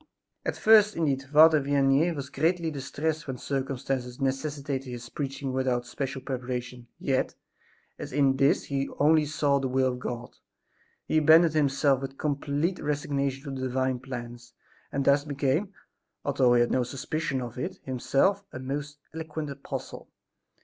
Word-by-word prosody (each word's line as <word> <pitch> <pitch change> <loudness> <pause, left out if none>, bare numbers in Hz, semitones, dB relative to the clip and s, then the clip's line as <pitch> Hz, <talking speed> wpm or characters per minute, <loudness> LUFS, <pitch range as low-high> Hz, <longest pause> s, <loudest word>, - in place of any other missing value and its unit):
At - - -2
first, 215 -1 +6
indeed, 145 -5 +1
Father 155 +3 +6
Vianney 140 +4 +2
was 140 -1 -6
greatly 165 0 +1
distressed 150 +2 -3
when 130 -1 -4
circumstances 135 -2 -3
necessitated 135 0 -2
his 120 0 -7
preaching 135 -1 -4
without 130 -2 0
special 135 +1 -4
preparation; 125 -2 -5
yet, 130 -1 0 0.6
as - - -6
in 135 -1 +3
this 140 +1 +3
he 140 -1 -2
saw - - -11
only 155 +1 +4
the 140 -2 +1
will 130 0 +2
of 125 - -7
God, 120 -1 -5 0.7
he 155 - +2
abandoned 160 +1 +6
himself 140 -2 +2
with 135 0 -6
complete 150 +4 -1
resignation 140 -2 -2
to 140 - -6
the 130 - -1
Divine 130 0 0
plans, 120 -2 -8 0.4
and 140 -1 -1
thus 140 +1 +4
became, 145 +6 0 0.5
although 130 -3 +3
he 120 - +5
had 120 - +2
no 130 - +2
suspicion 135 +2 -2
of 120 -1 -6
it - - -4
himself, 135 +10 +1
a - - -7
most 145 +3 -5 0.2
eloquent 155 -2 -5
apostle. 140 0 -7
140 Hz, 150 wpm, -27 LUFS, 130-150 Hz, 0.7 s, first